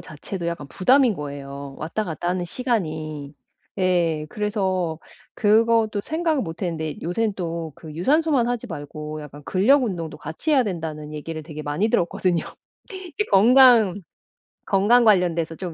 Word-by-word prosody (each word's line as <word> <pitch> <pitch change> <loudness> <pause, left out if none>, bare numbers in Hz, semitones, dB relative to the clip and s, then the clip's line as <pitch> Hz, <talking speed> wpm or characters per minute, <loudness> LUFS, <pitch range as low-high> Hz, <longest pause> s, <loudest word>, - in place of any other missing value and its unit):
자체도 170 +3 -7
약간 170 -4 -4
부담인 255 - +4
거예요 140 -2 -7
왔다 170 +8 -3
갔다 175 -1 -4
하는 180 0 -1
시간이. 155 - -3 0.4
예. 170 -4 +1
그래서 190 -6 -1 0.4
그것도 220 0 +3
생각을 315 -2 0
못했는데 160 -2 -4
요샌 205 +5 -1
또 165 -3 -4
그 155 +1 -11
유산소만 275 - +2
하지 245 0 -2
말고 150 -3 -7
약간 145 0 -11
근력 250 - +3
운동도 165 -7 -4
같이 160 - -4
해야 270 -3 +5
된다는 160 -6 -5
얘기를 155 +1 -6
되게 155 -1 -8
많이 150 +9 0
들었거든요. 175 -3 0 0.5
이게 375 +2 -4
건강 225 -2 +6 0.7
건강 210 +5 +4
관련돼서 175 -6 +2
좀 175 -1 -6
180 Hz, 315 characters per minute, -23 LUFS, 155-225 Hz, 0.7 s, 건강